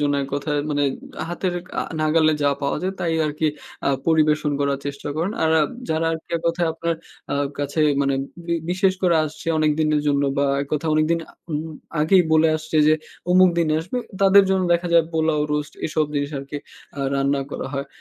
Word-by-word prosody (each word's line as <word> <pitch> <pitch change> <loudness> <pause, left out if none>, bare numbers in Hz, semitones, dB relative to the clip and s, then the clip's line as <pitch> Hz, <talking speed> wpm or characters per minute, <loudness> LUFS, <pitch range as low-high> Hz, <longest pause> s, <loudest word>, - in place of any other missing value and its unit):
জন্য 145 -1 +1
এক 135 - -5
কথায় 145 +1 -1
মানে 145 -1 +1 0.5
হাতের 175 +1 -2 0.3
আ - - 0 0.2
নাগালে 155 0 +3
যা 145 - +4
পাওয়া 140 - 0
যায়, 190 +1 -1
তাই 170 -1 0
আরকি 150 +1 -1 0.4
আ - - +4 0.2
পরিবেশন 155 -2 +3
করার 140 -1 +1
চেষ্টা 140 +1 -5
করেন। 170 +6 -1
আর 160 - +3
আ - - +4 0.3
যারা 160 +1 +1
আরকি 160 -1 -6
এক 165 - -6
কথায় 170 0 0
আপনার 165 0 -1 0.4
আ - - +1 0.2
কাছে 145 +2 -1 0.2
মানে 140 0 +1 0.3
বি 170 - 0 0.2
বিশেষ 185 +1 +2
করে 175 -2 +4
আসছে 150 +1 -8
অনেক 155 -1 +3
দিনের 155 -1 +2
জন্য 145 -1 +2 0.2
বা 140 - +3 0.2
এক 140 - -8
কথায় 155 +1 0
অনেকদিন 155 +2 +2
আ - - -19 0.2
উম 150 -1 -1 0.4
আগেই 180 +4 +5
বলে 160 0 +5
আসছে 155 0 -4
যে 155 - +6 0.4
অমুক 185 0 +6
দিনে 160 -2 +2
আসবে, 185 +10 -4 0.2
তাদের 195 0 +7
জন্য 190 -1 +2
দেখা 175 +1 -1
যায় 165 -1 +6
পোলাও, 160 -1 +1
রোস্ট 150 0 -2
এসব 155 0 +1
জিনিস 145 0 -1
আরকি 140 +2 -6 0.4
আ - - -2
রান্না 140 0 +1
করা - - -4
হয়। 140 0 -3
155 Hz, 200 wpm, -22 LUFS, 145-170 Hz, 0.5 s, তাদের